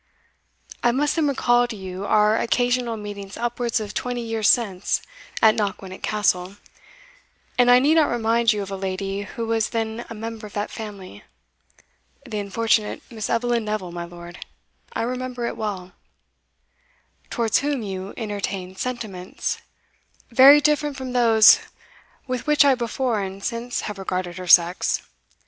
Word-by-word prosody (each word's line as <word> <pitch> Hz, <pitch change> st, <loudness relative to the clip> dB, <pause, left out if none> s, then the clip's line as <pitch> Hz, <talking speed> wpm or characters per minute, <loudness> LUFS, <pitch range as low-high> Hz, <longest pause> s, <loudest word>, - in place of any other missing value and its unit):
"I 240 Hz, -, +3 dB
must 290 Hz, +4 st, +1 dB
then 320 Hz, -3 st, +2 dB
recall 245 Hz, -3 st, +2 dB
to 235 Hz, -, -6 dB
you 190 Hz, 0 st, -6 dB
our 210 Hz, 0 st, +4 dB
occasional 245 Hz, 0 st, 0 dB
meetings 200 Hz, -2 st, -8 dB
upwards 240 Hz, 0 st, -1 dB
of 210 Hz, -1 st, -6 dB
twenty 245 Hz, -1 st, -3 dB
years 225 Hz, -2 st, 0 dB
since 200 Hz, -6 st, +2 dB, 0.4 s
at 220 Hz, -1 st, +7 dB
Knockwinnock 195 Hz, -3 st, -4 dB
Castle, 195 Hz, -3 st, 0 dB, 1.0 s
and 245 Hz, -1 st, +4 dB
I 245 Hz, -, +8 dB
need 280 Hz, +5 st, +4 dB
not 310 Hz, -, +4 dB
remind 230 Hz, 0 st, +2 dB
you 210 Hz, -2 st, -2 dB
of 195 Hz, -, -8 dB
a -, -, -2 dB
lady 195 Hz, +1 st, -3 dB
who 215 Hz, +3 st, -5 dB
was 225 Hz, -1 st, 0 dB
then 225 Hz, 0 st, -3 dB
a 230 Hz, -, -7 dB
member 225 Hz, 0 st, -6 dB
of 205 Hz, -, -16 dB
that 205 Hz, 0 st, -3 dB
family." 205 Hz, -4 st, -9 dB, 1.0 s
"The 220 Hz, -5 st, -4 dB
unfortunate 215 Hz, +1 st, 0 dB
Miss 220 Hz, -2 st, -5 dB
Eveline 235 Hz, 0 st, +1 dB
Neville, 210 Hz, -4 st, -3 dB
my 170 Hz, 0 st, -5 dB
lord; 175 Hz, 0 st, -10 dB, 0.5 s
I -, -, -2 dB
remember 250 Hz, 0 st, -3 dB
it -, -, -3 dB
well." 190 Hz, -4 st, -4 dB, 1.4 s
"Towards 230 Hz, -2 st, +1 dB
whom 280 Hz, -3 st, -1 dB
you 190 Hz, -1 st, -6 dB
entertained 200 Hz, -4 st, -4 dB
sentiments" 215 Hz, -8 st, -4 dB, 0.7 s
"Very 270 Hz, +5 st, +9 dB
different 295 Hz, -1 st, +1 dB
from 260 Hz, -2 st, -5 dB
those 225 Hz, -3 st, +7 dB, 0.7 s
with 255 Hz, +1 st, -4 dB
which 300 Hz, -1 st, +5 dB
I 275 Hz, -, +6 dB
before 240 Hz, -1 st, -1 dB
and 195 Hz, 0 st, -6 dB
since 235 Hz, +3 st, -3 dB
have 210 Hz, -2 st, -6 dB
regarded 185 Hz, -2 st, -3 dB
her 180 Hz, -, -7 dB
sex. 175 Hz, +1 st, +4 dB
220 Hz, 150 wpm, -23 LUFS, 195-245 Hz, 1.4 s, Very